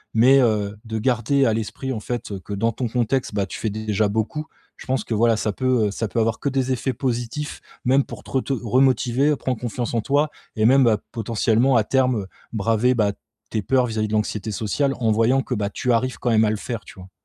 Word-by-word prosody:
Mais 130 +5 +6
heu, 105 -4 +1
de 110 -1 -4
garder 125 +4 +2
à 115 - +3
l'esprit, 115 +4 -3
en 110 - -3
fait, 115 -1 -4
que 100 - -6
dans 115 +3 +1
ton 120 +2 -3
contexte, 120 0 -1
bah, 100 -1 +1
tu - - -7
fais 110 - -1
déjà 110 0 0
beaucoup. 110 +9 -2 0.3
Je - - -12
pense 130 -4 0
que, - - -4
voilà, 115 +1 +3
ça 105 - -1
peut, 125 -2 +1
heu, - - -2
ça 110 +2 -2
peut 105 - -7
avoir 115 0 +1
que 140 - -1
des 135 -1 0
effets 130 +1 -1
positifs, 125 +4 -3 0.2
même 135 +3 +4
pour - - -10
te - - -13
reto 135 0 0
remotiver, 130 +3 +3
prendre 130 -3 -3
confiance 120 0 -3
en 115 - +1
toi 145 +5 +1 0.2
et 110 - +2
même, 120 -3 +5
potentiellement 115 +3 +1
à 115 - +4
terme, 125 -4 +1 0.3
braver, 115 +3 +2
bah, 105 -3 +2 0.4
tes 110 - 0
peurs 130 +5 +2
vis-à-vis 110 -2 -1
de 105 - -5
l'anxiété 105 0 -1
sociale, 115 +7 0
en 115 -3 +2
voyant 115 +5 +3
que, 125 - -4
bah, 105 -3 -1
tu 125 +4 -1
arrives 130 +2 0
quand 120 - -1
même 110 0 +4
à - - +2
le 110 - -1
faire, 115 -1 -5
tu - - -13
vois? 90 +1 -12
115 Hz, 230 wpm, -22 LUFS, 110-130 Hz, 0.4 s, Mais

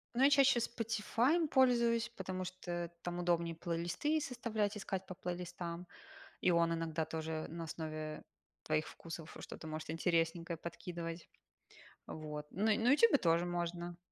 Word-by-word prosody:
Ну 260 - +4
я 280 - +8
чаще 275 -3 +6
"Спотифаем" 235 +7 +1
пользуюсь, 235 -4 +4
потому 185 -1 -3
что 175 -2 -4
там 175 0 -3
удобнее 170 -1 +1
плейлисты 175 - 0
составлять, 225 -6 -1
искать 190 -2 -3
по 185 - -6
плейлистам, 175 -1 -5 0.5
и 180 - +4
он 170 0 +4
иногда 165 -1 -1
тоже 160 0 -3
на 165 +1 -5
основе 155 -1 -5 0.4
твоих 155 0 +1
вкусов 165 -1 -8
что-то 160 - -8
может 155 0 -4
интересненькое 165 0 +1
подкидывать. 170 0 -6 0.8
Вот. 150 -1 -6
На 210 +3 +3
на 240 +4 +4
"Ютубе" 355 +1 +6
тоже 170 -2 +3
можно. 175 0 -3
175 Hz, 135 wpm, -36 LUFS, 165-220 Hz, 0.8 s, я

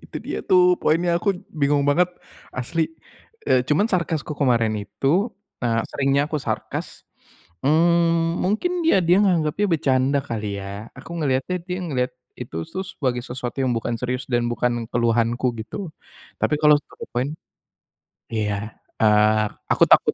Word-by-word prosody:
itu - - -8
dia - - -3
tuh 180 -1 +5 0.2
poinnya, 170 +3 +2
aku 205 - -2 0.2
bingung 145 -1 +2
banget, 175 +5 +4 0.5
asli, 160 +6 -1 0.6
eee, 130 - +4
cuman 155 +9 +3
sarkasku 165 -4 -1
kemarin 115 -5 +3
itu, 170 - 0 0.3
eee, 115 -1 +2
seringnya 140 0 +2
aku 155 0 -2
sarkas, - - -4 0.6
mmm, 165 +2 +3
mungkin 345 - 0
dia 325 - +5
dia 175 +2 +4
nganggapnya 175 +1 +2
bercanda 135 -1 +2
kali 105 -5 -4
ya. 100 +3 -8
Aku - - -11
ngeliatnya 140 +4 0
dia 180 - -2
ngelihat 130 -5 -1 0.3
itu 120 -10 -6
sus 190 0 -5
sebagai 125 -3 0
sesuatu 125 0 -5
yang 125 -2 +1
bukan 115 +1 -2
serius 125 +1 -2
dan 120 -1 +1
bukan 120 -1 -1
keluhanku 120 +1 +2
gitu. 170 - -6 0.5
Tapi - - +2
kalau 150 0 +7
satu - - -11
poin 125 +4 0 1.0
iya, 105 -1 -2 0.2
eee 105 0 +4 0.3
aku - - +4
takut - - +6
135 Hz, 145 wpm, -23 LUFS, 120-165 Hz, 1.0 s, kalau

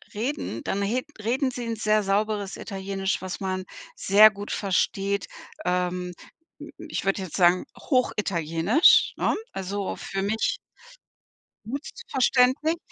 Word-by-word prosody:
reden, 230 - -3
dann 200 - -2
he 230 +6 0 0.2
reden 260 +4 +1
sie 245 -1 -5
'n 230 - -2
sehr 215 -1 +2
sauberes 205 0 -1
Italienisch, 195 -1 -3
was 185 -1 -5
man 185 -1 -3 0.3
sehr 210 +2 +7
gut 205 0 -8
versteht. 200 0 0 0.4
Ähm, 180 0 -1 0.5
m - - -10
m - - -9
ich - - -3
würde 195 0 +1
jetzt 185 -4 -5
sagen, 180 -1 +4
hochitalienisch, 200 - +3
ne, - - +1 0.2
also 195 +1 -3
für 195 0 -4
mich 220 +3 0 1.1
gut 275 +6 -5 0.2
verständlich. 260 +5 +3
200 Hz, 130 wpm, -25 LUFS, 190-225 Hz, 1.1 s, sehr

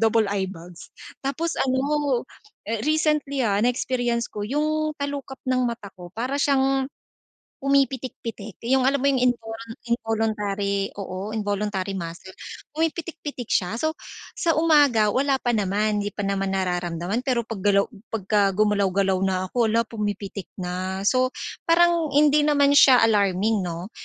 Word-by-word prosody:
double-eyebags. 195 -6 -1 0.4
Tapos 320 +5 -1
ano, 270 0 +1 0.6
recently 300 -2 +1
ha, 200 -2 +2
na-experience 245 -1 0
ko 210 - -5
'yung 305 +5 0
talukap 280 -1 -4
ng 255 0 +2
mata 230 -3 -6
ko 180 -2 -10
para 250 +6 -2
siyang 270 -1 +2 0.7
pumipitik-pitik, 260 -6 -1 0.2
'yung 265 -1 +4
alam 275 +1 +3
mo 280 - +2
'yung 270 - +1
invol 225 -2 -6 0.3
involuntary 210 -4 -1
oo, 190 +1 -5
involuntary 205 -2 -2
muscle. 170 +2 -7 0.5
Pumipitik-pitik 320 -5 -3
siya. 180 +2 +1
So, 315 0 0 0.4
sa 330 -2 +2
umaga 290 -10 +4
wala 270 +4 +2
pa 240 - +1
naman, 210 +1 0
hindi 205 0 -4
pa 205 - -4
naman 195 -1 -1
nararamdaman, 180 +1 -1
pero 250 -3 +1
paggalaw 200 -2 +2 0.3
'pagka 200 -1 +1
gumalaw-galaw 200 -2 +2
na 185 -1 -1
ako, 240 -2 +2
hala 230 +1 +3
pumipitik 205 -3 -4
na. 185 +1 -3
So, 255 +1 +2 0.3
parang 335 -2 +3
hindi 295 0 +5
naman 285 -1 +4
siya 255 -3 +7
alarming 205 0 +2
'no, 175 +3 -5
225 Hz, 130 wpm, -24 LUFS, 200-275 Hz, 0.7 s, siya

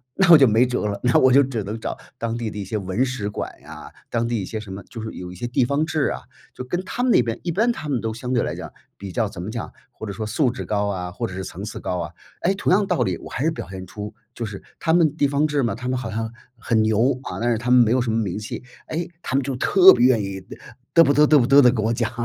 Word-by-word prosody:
那 195 -2 +3
我 165 - +11
就 135 - +6
没 115 +4 +4
辙 125 -3 -2
了， 100 -1 -3
那 125 0 +4
我 130 -1 +5
就 140 - +7
只 130 -6 -2
能 105 +3 -5
找 - - -4 0.2
当 115 0 -2
地 115 -2 -3
的 105 - -8
一 100 - -4
些 110 - -3
文 95 +4 -1
史 125 -6 -3
馆 105 - -4
呀， 75 +1 -11 0.2
当 115 0 0
地 120 -1 -1
一 95 - -4
些 110 - -5
什 105 -2 -10
么 100 +1 -7
就 115 - -9
是 110 - -5
有 90 0 -7
一 - - -10
些 120 - -4
地 125 +1 +1
方 140 +4 0
志 155 -3 0
啊， - - -4 0.3
就 - - -7
跟 175 +8 -2
他 235 - -4
们 250 -1 +3
那 125 - +5
边 115 0 -3
一 175 - -1
般 225 +8 +2
他 155 -9 -6
们 130 -4 0
都 110 0 -3
相 125 +3 -5
对 120 - +2
来 - - -2
讲 - - -8 0.3
比 95 -1 -7
较 110 +4 0
怎 95 -4 -8
么 95 - -5
讲， 115 0 -5 0.2
或 110 - -9
者 100 - -5
说 110 +2 -4
素 120 +4 +1
质 125 - -6
高 105 -1 0
啊， 90 -3 -3
或 115 +5 -4
者 95 - -9
是 95 0 -5
层 95 - -8
次 105 - -6
高 90 - -3
啊。 85 -1 -4 0.3
诶， 185 - +2
同 190 - 0
样 205 +1 +3
道 180 -9 0
理， 95 -6 -1
我 - - -10
还 135 - -2
是 160 - +3
表 155 - -6
现 95 -1 -7
出 105 +2 -7 0.2
就 115 - -4
是 105 -2 -7 0.2
他 160 - +1
们 160 -4 +3
地 145 -3 +2
方 145 +2 +1
志 145 -2 0
嘛， 115 - 0
他 125 +2 -6
们 130 0 0
好 115 -3 -5
像 110 +1 -3 0.3
很 110 -2 +1
牛， 115 +5 +2
啊， - - -6
但 120 +2 +1
是 115 - +1
他 120 +2 -2
们 125 - +7
没 110 - +1
有 130 - +3
什 120 -2 -1
么 110 - 0
名 95 -2 -3
气。 105 +2 -6 0.3
诶， 170 +2 -3
他 130 - -2
们 140 - +3
就 135 -1 -3
特 190 +8 +7
别 120 0 +3
愿 120 -5 +3
意 95 -1 -5 0.2
呃， 120 - -15 0.2
嘚 165 -1 +7
不 140 - +3
嘚 150 - +6
嘚 150 0 +5
不 120 - +2
嘚 140 +1 +7
地 125 -2 +6
跟 110 -4 -1
我 115 - +1
讲。 115 -1 -1
120 Hz, 335 characters per minute, -22 LUFS, 105-140 Hz, 0.3 s, 我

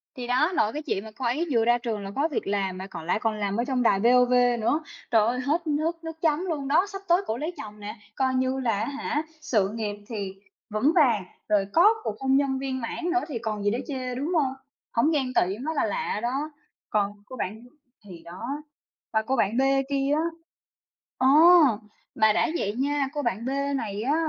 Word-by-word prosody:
Thì 245 -1 -6
đó, 260 +8 +2
nội 215 -7 +2
cái 300 - -3
chuyện 200 -8 -2
mà 220 - -10
cô 255 - -4
ấy 295 +9 0
vừa 230 -3 +3
ra 240 +1 +4
trường 230 -3 -3
là 195 - -6
có 285 +3 +2
việc - - -2
làm 195 -2 -1
mà 190 +1 -6
còn 165 -4 -8
lại 180 - +1
còn 225 -1 +1
làm 200 -1 -1
ở 235 - +1
trong 255 -2 0
đài 195 -4 +4
VOV 250 +2 +4 0.3
nữa. 280 +8 +1 0.3
Trời 220 -2 +4
ơi, 250 +2 0
hết 310 +6 -1
nước 325 +3 -1
nước 325 0 -7
chấm 320 +2 +1
luôn 295 -6 -3
đó! 315 +7 +4
Sắp 390 -1 -7
tới 350 +3 +4
cổ 220 - -1
lấy 310 +6 -3
chồng 210 0 -9
nè, 210 +2 -6 0.2
coi 260 -1 +1
như 260 +1 0
là 230 -6 0
á 220 - 0
hả, 290 +2 -2 0.2
sự 220 -11 +1
nghiệp 215 -2 -3
thì 200 -5 -4 0.4
vững 215 +8 +2
vàng, 240 - +4 0.3
rồi 205 -2 +3
có 400 +7 +6
cuộc 210 - -3
hôn 265 0 +2
nhân 270 -2 +1
viên 260 -2 -3
mãn 230 +8 -4
nữa 365 - +2
thì 270 -8 -4
còn 215 -3 -3
gì 205 - +2
để 235 - -1
chê, 255 -3 -4
đúng 290 +7 -2
hông? 275 -5 +2 0.4
Hổng 240 +7 +3
ghen 265 -5 0
tỵ 190 -1 +1
mới 310 +7 -4
là - - +2
lạ 475 - -2
đó. 275 +5 -1 0.4
Còn 205 -1 +1
cô 255 - -9
bạn 220 -1 -4 0.4
thì 175 -4 -11
đó. 180 +7 -8 0.7
Và 220 - +3
cô 260 +5 -1
bạn 225 -1 +1
B - - +4 0.3
kia 275 0 0
á 310 - +1 1.0
ờ! 260 - +3 0.9
Mà 220 -1 +4
đã - - +2
vậy 205 -7 -1
nha, 280 +2 0
cô 295 - -2
bạn 235 -2 -2
B - - -1 0.3
này 210 -4 -4
á, 280 +6 +1
250 Hz, 225 wpm, -26 LUFS, 215-290 Hz, 1.0 s, có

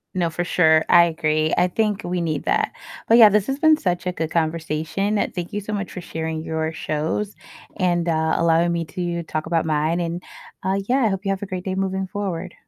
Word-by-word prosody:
No, 170 -2 +1
for 175 +2 -2
sure, 160 -3 +3
I 170 0 +7
agree, 155 -1 0
I 180 - +4
think 210 +2 -1
we 175 0 -2
need 155 -3 -2
that, - - +1 0.4
but 230 - +6
yeah, 220 -3 +9
this 210 0 +1
has 270 0 -1
been 315 0 +5
such 180 - -2
a 180 - 0
good 160 -3 -3
conversation, 165 +5 -1 0.2
thank 175 0 -5
you 205 - -1
so 210 +1 -6
much 200 -1 -3
for 180 - -7
sharing 160 -1 -4
your 160 0 -2
shows 160 +6 -3 0.4
and, 175 -2 +1
uh, 160 -1 +1
allowing 170 +1 +3
me 170 -1 -1
to 170 0 -3
talk 155 0 -4
about 165 -1 +1
mine, 155 +2 0
and, 170 +1 -3 0.4
uh, 190 +1 0
yeah, 255 - +2
I - - +4
hope 195 0 -3
you 195 - +1
have 195 - -3
a 200 - -5
great 185 0 -5
day 190 - -2
moving 190 0 -1
forward. 185 -3 -4
175 Hz, 220 wpm, -22 LUFS, 160-195 Hz, 0.4 s, yeah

